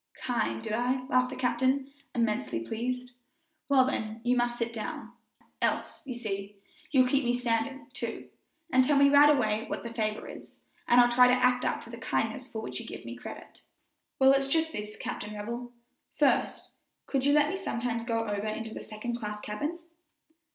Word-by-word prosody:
"Kind, 115 - -1
did - - -3
I?" 250 +3 0
laughed 255 0 +3
the - - -6
captain, 260 +2 +1 0.2
immensely 210 - 0
pleased. 250 +2 -3 0.6
"Well, 265 -2 +6
then, 220 -4 -3
you 245 +1 +3
must 240 0 +1
sit 235 0 -2
down, 220 -2 -5 0.5
else, - - -1
you 255 - -4
see, 205 -3 -4 0.3
you'll 260 -4 +4
keep 275 +2 +2
me 240 0 +1
standing; 245 +3 -1
too, 235 -2 -5 0.5
and 260 0 +6
tell 285 +2 +3
me 280 0 +6
right 290 +1 +8
away 225 -7 +2
what - - -4
the 235 -1 -6
favor 215 -2 -2
is, - - -12 0.2
and 240 - +6
I'll 240 0 +6
try 250 +1 +7
to 250 - +5
act 250 0 +2
up - - 0
to 230 - -11
the 235 - -7
kindness 230 +3 -1
for 220 -4 -6
which - - -5
you - - -9
give - - -8
me - - -6
credit." - - -10 0.6
"Well, 265 0 +6
it's 275 0 +3
just 320 +3 +2
this, 210 -5 -5
Captain 210 +1 -5
Revell: 235 +4 -5 0.4
first, - - +1 0.4
could 270 -2 -1
you 285 +1 +4
let 295 0 +4
me - - -2
sometimes 235 -11 -2
go 230 -1 0
over 205 0 -2
into 220 +1 -4
the - - -6
second 235 +3 -5
class 210 -2 -4
cabin?" 255 +12 -3
240 Hz, 190 wpm, -29 LUFS, 220-260 Hz, 0.6 s, right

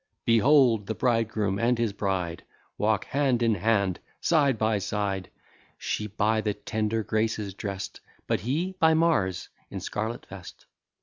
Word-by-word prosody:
Behold, 115 -3 +4
the 110 - -2
bridegroom 110 -5 0
and 120 +1 +2
his 115 -3 0
bride 95 -5 -2 0.3
Walk 105 -1 +1
hand 135 -4 +1
in 115 -1 +3
hand, 100 -2 +1
and - - -32
side 145 -7 +3
by 110 -1 +1
side; 100 -1 -2 0.5
She, 105 - -3
by 110 +2 +1
the 105 -2 -1
tender 110 0 -2
Graces 110 -2 -1
drest, 100 -1 -5 0.3
But - - 0
he, 160 - -1
by 160 -2 +5
Mars, 150 - +1 0.2
in - - -5
scarlet 110 +3 -4
vest. - - -11
110 Hz, 145 wpm, -27 LUFS, 100-120 Hz, 0.5 s, by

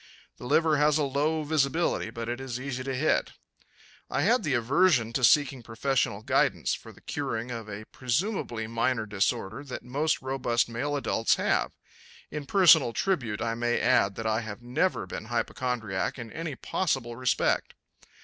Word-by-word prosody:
The 125 - -8
liver 160 +2 +3
has 150 +1 +4
a 150 - +1
low 150 +3 0
visibility 150 -3 +1
but 115 0 -6
is 120 0 -4
easy 130 -1 -4
to 135 -1 -2
hit. 155 +5 +1 0.8
I - - 0
had 250 - +3
the 145 -4 0
aversion 120 -1 +3
to 130 - -1
seeking 135 0 +4
professional 115 -2 -1
guidance - - +1
for - - -7
the - - -19
curing 115 +2 -3
of 115 -3 -6
a 105 +1 -7
presumably 130 - -2
minor 115 +1 0
disorder 95 +3 -1
that 130 - -7
most 145 +6 0
robust 130 -3 0
male 125 +5 -2
adults 115 -5 +1
have. - - 0 0.6
In 150 -2 -5
personal 160 -10 +6
tribute 120 - -1
I 115 -1 -1
may 120 +1 0
add 100 -6 +3
that 115 - -5
I 110 +1 +1
have 110 0 -8
never 125 - 0
been 95 - -7
hypochondriac 120 -1 -2
in 115 -3 -8
any 165 -3 -4
possible 130 -7 -2
respect. 125 +1 0
125 Hz, 160 wpm, -28 LUFS, 115-145 Hz, 0.8 s, personal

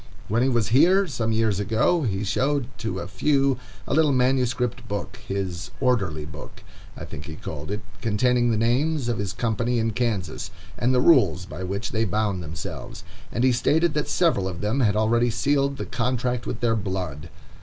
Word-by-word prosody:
When 110 +3 +2
he 130 - +3
was 120 -4 +1
here, 175 - +5
some 120 -8 -2
years 110 -3 +1
ago, 110 - +2
he 105 -7 -1
showed 135 +6 0
to 110 -5 -3
a - - -4
few 135 +5 +1 0.3
a - - -2
little 155 0 +4
manuscript 125 -2 +1
book,—his 95 -3 -4
"orderly 95 - 0
book" 75 0 -11 0.3
I - - -6
think 70 - -8
he 80 - -7
called 75 -1 -7
it,—containing 115 +3 0
the 115 - +1
names 130 +5 +1
of 115 - -1
his 100 -2 -2
company 120 +1 -1
in 115 0 +1
Kansas, 110 -5 -2 0.3
and 120 - +1
the 125 -1 +3
rules 100 - +4
by 95 -1 -7
which 100 +3 -3
they 110 0 +1
bound 105 -2 0
themselves; 80 -1 -7 0.3
and 120 - -1
he 130 - +5
stated 150 +7 +2
that 150 0 -1
several 160 - +2
of 90 -3 -5
them 105 +6 0
had 105 -5 +3
already 115 +3 +3
sealed 140 +3 +1
the - - -4
contract 125 0 -1
with - - -4
their 115 -2 +2
blood. 90 -7 -4
115 Hz, 180 wpm, -24 LUFS, 100-130 Hz, 0.3 s, here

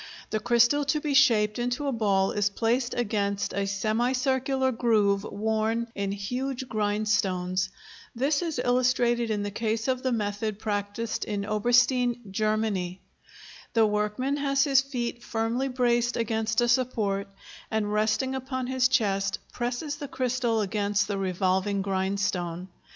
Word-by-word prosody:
The 215 - 0
crystal 240 +5 +3
to 300 +2 +1
be 295 -1 -2
shaped 225 -6 +4
into 245 +4 -1
a 280 - +1
ball 200 -5 +1
is 205 -1 +1
placed 235 +4 0
against 200 -3 -1
a 200 0 -1
semicircular 260 +6 0
groove 215 -4 +2
worn 220 +2 -1
in 200 -1 -2
huge 250 +6 -3
grindstones. 205 -4 0 0.5
This 280 +6 +1
is 330 -5 -3
illustrated 245 -1 +2
in 210 -2 -1
the 205 - -3
case 220 +2 -2
of 255 -1 0
the 260 - 0
method 210 -1 -2
practised 210 +1 -3
in 205 -2 -3
Oberstein, 245 +3 +2
Germany. 210 -3 -1 0.7
The 225 -1 +5
workman 210 +7 0
has 275 -1 +2
his 275 -2 +4
feet 245 -3 -4
firmly 230 +4 -1
braced 240 -2 +1
against 225 0 0
a 240 - +2
support, 220 -5 +1 0.4
and, 210 -2 -1
resting 220 +5 +1
upon 260 -1 -3
his 255 0 +2
chest, 200 -5 +1 0.2
presses 245 +5 -3
the 290 -1 -6
crystal 245 -4 0
against 200 0 0
the 200 -2 -2
revolving 190 +1 0
grindstone. 190 -2 -2
225 Hz, 140 wpm, -27 LUFS, 205-250 Hz, 0.7 s, The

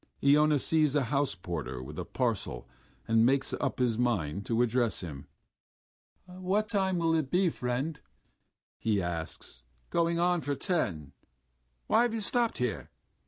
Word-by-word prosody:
Iona 150 +1 +5
sees 150 +1 +2
a 145 - +3
house 140 -2 0
porter 75 -8 -5
with 75 +3 -8
a - - -3
parcel 115 - -2 0.4
and 115 0 +4
makes 135 +3 +2
up 140 - -2
his 120 -3 +1
mind 100 -7 0
to 115 +1 +2
address 120 -2 +1
him. 75 -5 -8 1.0
"What 185 +4 -1
time 190 -4 +1
will 165 -1 +2
it 155 -5 0
be, 180 +2 +3
friend?" 135 +3 -3 0.8
he 105 -3 +1
asks. 80 -7 -5 0.3
"Going 170 0 +2
on 175 0 +2
for 145 -1 -2
ten.... 85 - -2 0.7
Why - - +4
have 240 -2 +1
you 225 - -2
stopped 235 +2 0
here? 125 -4 -2
130 Hz, 150 wpm, -30 LUFS, 100-170 Hz, 1.0 s, Iona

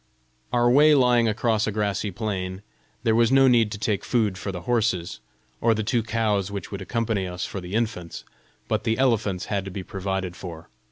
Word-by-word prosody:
Our 120 -1 +3
way 150 +5 +6
lying 125 -3 +4
across 110 0 +1
a - - 0
grassy 105 -1 -1
plain, 95 -2 -4 0.4
there 110 - +3
was 115 +1 +3
no 135 0 +6
need 115 -4 +4
to - - -4
take 105 -1 -1
food 110 -6 +1
for 90 +2 -5
the 90 -2 -6
horses, 110 -6 0 0.4
or 115 -1 +3
the 110 - -1
two 120 +2 +1
cows 105 -3 0
which 100 -3 -6
would 100 -1 -5
accompany 110 -2 -1
us 90 0 -4
for 95 - -6
the 90 +3 -6
infants; 110 -7 -3 0.4
but - - -1
the 115 -1 0
elephants 110 -8 +1
had 100 -2 -2
to - - -5
be 95 0 -6
provided 95 -1 -3
for. 85 -3 -9
105 Hz, 200 wpm, -24 LUFS, 95-115 Hz, 0.4 s, way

